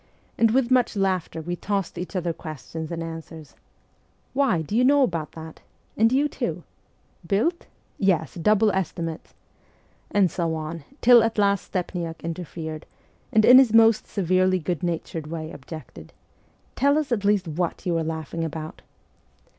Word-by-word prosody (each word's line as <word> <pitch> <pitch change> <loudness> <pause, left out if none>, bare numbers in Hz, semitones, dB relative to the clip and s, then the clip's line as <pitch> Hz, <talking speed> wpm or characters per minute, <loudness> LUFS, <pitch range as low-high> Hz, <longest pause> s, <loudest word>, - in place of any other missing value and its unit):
And 230 - +4
with 250 +2 +1
much 250 -3 +3
laughter 185 -4 -1
we 175 +2 -3
tossed 195 0 -3
each 180 +3 -6
other 175 -2 -1
questions 155 +1 -7
and 165 0 -3
answers: 160 -2 -9 0.4
' - - -40
Why, 255 -12 +2
do 205 - -4
you 245 - +4
know 280 +2 +5
about 165 - -2
that? 160 0 -10
' - - -39
' - - -39
And 225 +2 +3
you 280 +3 +3
too? - - -4 0.2
' - - -40
' 170 - -22
Built? 330 - 0
' - - -39
' - - -39
Yes, 170 -7 +1
double 210 +5 +3
estimates! 170 -4 -4 0.4
' - - -35 0.3
and 195 -5 +3
so 165 -2 -1
on, 155 0 -6 0.2
till 240 -1 +8
at 225 0 0
last 200 -1 +2
Stepniak 170 -3 -4
interfered, 165 -2 -6 0.4
and 215 0 +4
in 255 +1 +9
his 240 -5 +4
most 225 -1 +5
severely 185 -1 +2
good 175 -2 -3
natured 165 -2 -3
way 160 0 -5
objected: 155 +2 -10 0.3
' - - -37
Tell 285 +2 +3
us 305 -4 -2
at 215 -4 0
least 200 -3 +2
what 165 +2 -3
you 175 -2 0
are - - -1
laughing 160 0 -4
about.' 160 0 -6
180 Hz, 180 wpm, -24 LUFS, 160-215 Hz, 0.4 s, in